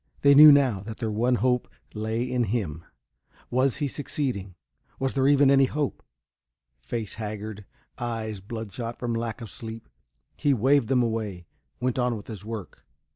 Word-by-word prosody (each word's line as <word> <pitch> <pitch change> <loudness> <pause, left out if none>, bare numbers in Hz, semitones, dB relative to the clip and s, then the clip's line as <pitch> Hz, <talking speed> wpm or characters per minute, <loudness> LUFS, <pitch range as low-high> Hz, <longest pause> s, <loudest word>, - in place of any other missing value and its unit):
They 140 0 +7
knew 150 +2 +11
now 135 -8 +4
that 110 +3 -8
their 115 -3 -2
one 120 +4 +2
hope 125 0 +1 0.3
lay 110 +2 -2
in 125 -1 0
him. 95 -8 -2 0.7
Was 130 +1 +2
he 145 - -1
succeeding? 125 - -3 0.4
Was 135 0 -1
there 135 -1 +2
even 140 -1 +5
any 135 -1 +6
hope? 145 +1 -2 0.8
Face 115 -4 -5
haggard, 105 -1 -6 0.3
eyes 115 -3 -3
bloodshot 115 +2 -6
from 120 -1 -2
lack 115 0 -3
of 115 - -8
sleep, 115 -2 -8 0.5
he 145 -2 +2
waved 135 +2 +3
them 125 -2 +3
away, 110 -6 -3 0.3
went 125 +1 -1
on 125 -2 +1
with 100 - -10
his 110 -3 -8
work. 110 -3 -7
115 Hz, 160 wpm, -26 LUFS, 110-130 Hz, 0.8 s, knew